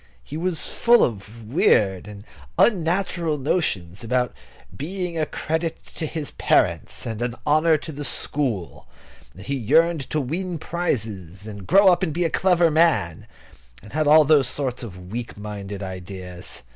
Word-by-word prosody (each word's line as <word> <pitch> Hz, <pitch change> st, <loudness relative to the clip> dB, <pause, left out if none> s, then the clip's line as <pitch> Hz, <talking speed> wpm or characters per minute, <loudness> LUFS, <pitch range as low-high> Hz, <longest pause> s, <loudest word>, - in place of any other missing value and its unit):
He 145 Hz, -, -8 dB
was 170 Hz, 0 st, -2 dB
full 240 Hz, 0 st, +5 dB
of 110 Hz, 0 st, -4 dB
weird 100 Hz, -, +2 dB
and 105 Hz, -1 st, -10 dB, 0.3 s
unnatural 175 Hz, -4 st, +2 dB
notions 110 Hz, -, -1 dB
about 125 Hz, +1 st, 0 dB, 0.4 s
being 180 Hz, -, -4 dB
a 155 Hz, -2 st, 0 dB
credit 160 Hz, +1 st, -3 dB
to 160 Hz, -, -2 dB
his 155 Hz, -1 st, -4 dB
parents -, -, +1 dB
and 115 Hz, -1 st, -4 dB
an 120 Hz, 0 st, -2 dB
honour 155 Hz, +2 st, +4 dB
to 160 Hz, -, -7 dB
the 145 Hz, 0 st, -6 dB
school; 125 Hz, -, -2 dB, 0.5 s
and 95 Hz, -, -11 dB
he 140 Hz, -, -3 dB
yearned 155 Hz, +5 st, +2 dB
to 155 Hz, -, 0 dB
win 170 Hz, +6 st, -3 dB
prizes, 105 Hz, -, -3 dB
and 100 Hz, -3 st, -8 dB
grow 195 Hz, +3 st, +6 dB
up 175 Hz, -, -1 dB
and 170 Hz, -5 st, -1 dB
be 175 Hz, +2 st, 0 dB
a 165 Hz, -, 0 dB
clever 175 Hz, -3 st, +3 dB
man, 155 Hz, -, +2 dB, 0.6 s
and 105 Hz, -, -13 dB
had 155 Hz, 0 st, +1 dB
all 155 Hz, +1 st, +7 dB
those 145 Hz, -3 st, +4 dB
sorts 130 Hz, -3 st, -3 dB
of 90 Hz, -5 st, -9 dB
weak 120 Hz, -1 st, -5 dB
minded 100 Hz, -1 st, -6 dB
ideas. 90 Hz, -3 st, -7 dB
140 Hz, 160 wpm, -23 LUFS, 105-165 Hz, 0.6 s, all